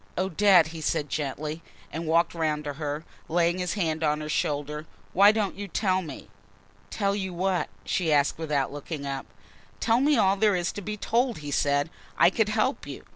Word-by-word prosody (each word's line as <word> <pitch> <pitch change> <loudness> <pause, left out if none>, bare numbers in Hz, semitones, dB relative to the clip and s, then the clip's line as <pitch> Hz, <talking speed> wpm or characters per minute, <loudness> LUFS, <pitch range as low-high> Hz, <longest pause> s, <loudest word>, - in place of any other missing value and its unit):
"Odette," 185 -2 +4
he 165 -1 -8
said 150 -1 -1
gently 150 +2 -3 0.3
and 165 +1 -4
walked 165 +2 +3
round 155 -3 -1
to 145 -1 -4
her, 150 +2 -4 0.2
laying 175 +2 +2
his 180 +1 -1
hand 160 -5 -1
on 150 0 +2
her 150 - -5
shoulder. 150 +1 -2 0.3
"Why 200 +2 +7
don't 215 -3 -1
you 200 0 -6
tell 190 0 +1
me?" 155 -6 -8 0.6
"Tell 200 0 0
you 190 -3 -3
what?" 185 0 0 0.2
she 170 -4 0
asked, 145 +1 +2
without 150 -4 -1
looking 145 0 -6
up. 135 -1 -4 0.5
"Tell 225 - +3
me 295 +1 +4
all 190 0 +4
there 210 -1 +3
is 175 0 0
to 205 - -7
be 210 +2 -4
told," 235 +3 +1
he 145 - -4
said. 145 +2 +1 0.3
"I 175 - +6
could 215 +1 +1
help 220 +6 0
you. - - -8
170 Hz, 190 wpm, -27 LUFS, 150-195 Hz, 0.6 s, Why